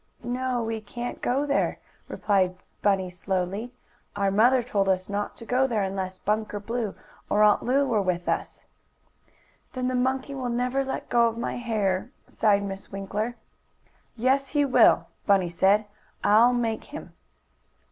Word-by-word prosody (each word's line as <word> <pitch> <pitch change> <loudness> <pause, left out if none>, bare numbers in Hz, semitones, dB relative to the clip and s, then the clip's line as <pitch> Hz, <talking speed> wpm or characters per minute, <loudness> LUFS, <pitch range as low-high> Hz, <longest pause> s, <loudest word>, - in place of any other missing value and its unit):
"No, 250 0 -1
we 225 -1 -3
can't 240 +3 -6
go 270 +4 +1
there," 280 -1 0 0.3
replied 190 -3 +1 0.3
Bunny 190 -3 +1
slowly. 190 +5 -3 0.4
"Our 200 -1 +1
mother 240 +5 +4
told 200 -5 0
us 185 -1 +1
not 205 +1 -3
to 230 - -10
go 255 +3 +2
there 220 -5 0
unless 190 -1 -3
Bunker 210 +1 -1
Blue 225 0 -3 0.3
or 210 +1 +4
Aunt 210 -1 +5
Lu 275 +3 +2
was 220 -5 +1
with 180 -2 -1
us." - - -3 1.1
"Then 255 -1 -2
the - - -2
monkey 260 +2 0
will 260 -2 -3
never 250 +3 0
let 265 - -4
go 235 -1 +4
of 230 0 -3
my 235 - -3
hair," 215 -4 -1 0.2
sighed 205 -2 +2
Miss 195 -1 -6
Winkler. 205 +4 -3 0.8
"Yes, 265 +4 +2
he 290 +1 +1
will," 265 - +5 0.2
Bunny 195 -3 +4
said. 195 +5 +3 0.4
"I'll 220 +4 +6
make 230 -3 -1
him." 295 - -9
220 Hz, 155 wpm, -26 LUFS, 195-250 Hz, 1.1 s, I'll